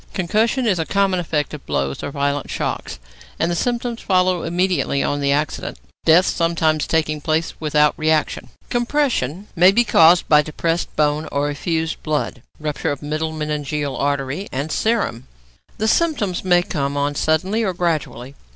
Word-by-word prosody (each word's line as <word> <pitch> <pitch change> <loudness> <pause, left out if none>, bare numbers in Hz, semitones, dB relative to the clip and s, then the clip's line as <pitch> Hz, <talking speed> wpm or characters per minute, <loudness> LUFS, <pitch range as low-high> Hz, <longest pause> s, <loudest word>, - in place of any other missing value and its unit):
Concussion 220 +7 +1
is 195 -6 +2
a 160 - 0
common 195 -2 +1
effect 155 -4 -2
of 150 - -7
blows 70 -1 -2
or - - -4
violent 140 0 -2
shocks, - - -3 0.4
and 170 - 0
the - - 0
symptoms 240 +3 -2
follow 185 -2 +2
immediately 175 -4 0
on 145 - -1
the 140 0 +1
accident, 150 +2 -2 0.3
death 170 +3 +6
sometimes 160 -2 +1
taking 155 -2 0
place 160 +2 0
without 150 -1 +3
reaction. 155 -1 0 0.2
Compression 240 - 0
may 180 +2 +6
be 235 +4 +3
caused 170 -5 +5
by 150 -1 +6
depressed 165 +3 -2
bone 150 +1 +1
or 145 +1 0
effused 160 +2 -2
blood 150 -5 -2 0.2
(rupture 150 -1 -2
of 145 0 -5
middle 155 +2 -2
meningeal 150 -2 -3
artery) 140 +6 -2
and 140 +4 -3
serum. 205 - -1 0.5
The 220 - 0
symptoms 225 - +1
may 175 -1 +4
come 140 -4 -2
on 145 +1 0
suddenly 180 +9 +1
or 195 - +1
gradually. 150 -7 -2
160 Hz, 160 wpm, -20 LUFS, 145-185 Hz, 0.5 s, death